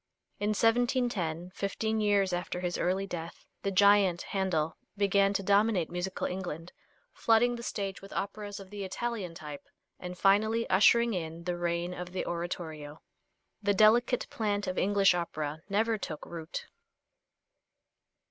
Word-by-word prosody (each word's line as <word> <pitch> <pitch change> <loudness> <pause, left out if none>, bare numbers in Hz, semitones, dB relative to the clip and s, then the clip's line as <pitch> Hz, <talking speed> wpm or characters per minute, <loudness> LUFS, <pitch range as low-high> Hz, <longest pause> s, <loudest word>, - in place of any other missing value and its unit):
In 210 +1 0
1710, 225 - +1
fifteen 220 +3 -1
years 200 -3 +2
after 180 0 -2
his 180 -1 -2
early 190 +2 +1
death, 170 -3 -7 0.2
the 195 - -1
giant 195 -2 +4
Handel 170 -5 -1 0.2
began 200 0 +3
to 195 - -1
dominate 200 -3 +2
musical 180 +2 -3
England, 175 -2 -5 0.4
flooding 235 +2 +3
the 235 - -7
stage 200 -4 -4
with 195 - -12
operas 205 +1 -4
of 195 0 -12
the 205 -1 -5
Italian 195 -3 -4
type 150 -3 -9 0.3
and 180 0 -7
finally 215 +4 +3
ushering 235 +5 +5
in 165 -2 -4
the 175 0 -2
reign 175 0 -1
of 180 0 -7
the 185 - -2
oratorio. 160 -3 -5 0.6
The 205 0 +2
delicate 235 +4 +4
plant 205 -2 -1
of 185 - -2
English 200 -1 +4
opera 155 -3 -3
never 220 +2 +1
took 155 -5 -6
root. 165 -2 -6
195 Hz, 140 wpm, -30 LUFS, 175-205 Hz, 0.6 s, ushering